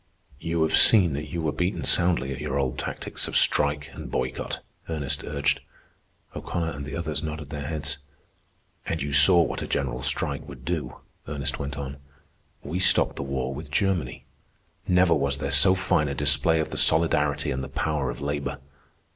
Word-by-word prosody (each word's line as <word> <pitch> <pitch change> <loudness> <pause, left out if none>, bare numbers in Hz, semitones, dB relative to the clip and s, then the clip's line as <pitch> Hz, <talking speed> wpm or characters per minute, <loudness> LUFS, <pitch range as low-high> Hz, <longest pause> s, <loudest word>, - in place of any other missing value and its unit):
"You 85 0 -1
have 80 - +2
seen 95 -9 +7
that 75 +2 -5
you 85 -2 -4
were 75 - 0
beaten 90 +5 -2
soundly 75 -7 +2
at 70 - -8
your 70 -2 -2
old 65 -3 -2
tactics - - -3
of - - 0
strike 75 0 +2
and - - -8
boycott," 65 0 -3 0.3
Ernest 75 -2 -3
urged. 70 -1 -1 0.8
O'Connor 85 -1 -3
and 70 -2 -7
the - - -6
others 80 -3 -3
nodded 75 -2 -6
their 70 -2 -5
heads. 75 -2 -4 0.9
"And - - -2
you 70 0 -3
saw 85 +5 +8
what - - -4
a - - -4
general 65 -2 -2
strike - - -2
would - - -11
do," - - -4 0.3
Ernest 70 -2 -3
went 70 +1 -5
on. 70 -1 -6 0.7
"We 85 +5 -4
stopped 95 - +3
the - - -3
war 70 -1 -3
with 75 +2 -8
Germany. 80 -5 -1 0.6
Never 90 -1 +4
was 70 -2 0
there 70 0 -3
so 95 +7 +6
fine 85 -5 +1
a 70 - -3
display 75 +3 +3
of 80 - -2
the - - -4
solidarity 75 -3 +2
and 65 +1 -3
the - - -7
power 75 -4 -2
of - - -6
labor. 70 0 -3
75 Hz, 180 wpm, -25 LUFS, 70-80 Hz, 0.9 s, saw